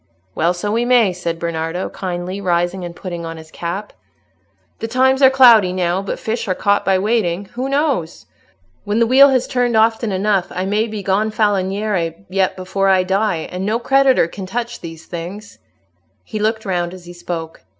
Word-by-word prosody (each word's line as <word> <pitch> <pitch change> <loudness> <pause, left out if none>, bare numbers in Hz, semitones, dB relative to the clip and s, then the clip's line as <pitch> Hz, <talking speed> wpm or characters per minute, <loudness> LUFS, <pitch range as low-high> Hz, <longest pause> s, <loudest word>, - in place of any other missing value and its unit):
"Well, 170 +3 +1
so 205 +4 -3
we 230 +2 +1
may," 240 -6 +3
said 170 -2 -4
Bernardo, 165 +1 -3
kindly, 185 +1 -5
rising 175 0 0
and 170 -1 -7
putting 175 -2 -6
on 165 0 -6
his 160 0 -13
cap. 185 +5 -5 0.9
"The 225 - -3
times 260 +3 +2
are 265 - +8
cloudy 240 -8 +6
now, 180 0 0
but 200 - -4
fish 230 +1 -3
are 185 - 0
caught 200 +2 +1
by 190 0 +2
waiting. 200 -3 0
Who 255 +3 -3
knows? 275 - -1 0.6
When 205 +1 -1
the 230 - +4
wheel 270 +4 +7
has 260 -2 +2
turned 245 -2 0
often 225 0 +2
enough, 195 -1 +1
I 185 +1 -3
may 210 +3 0
be 215 -2 -6
Gonfaloniere 200 -3 0
yet 190 0 0
before 190 +1 -1
I 190 -1 +4
die; 190 -3 0
and 180 +1 -4
no 215 +3 0
creditor 270 -4 +3
can 190 +2 -8
touch 235 +4 -4
these 165 -1 -9
things." 185 +5 -8 0.6
He 215 - -6
looked 220 +1 -1
round 175 -2 -2
as 180 -1 -13
he 175 - -10
spoke. 165 -2 -6
195 Hz, 180 wpm, -18 LUFS, 175-225 Hz, 0.9 s, are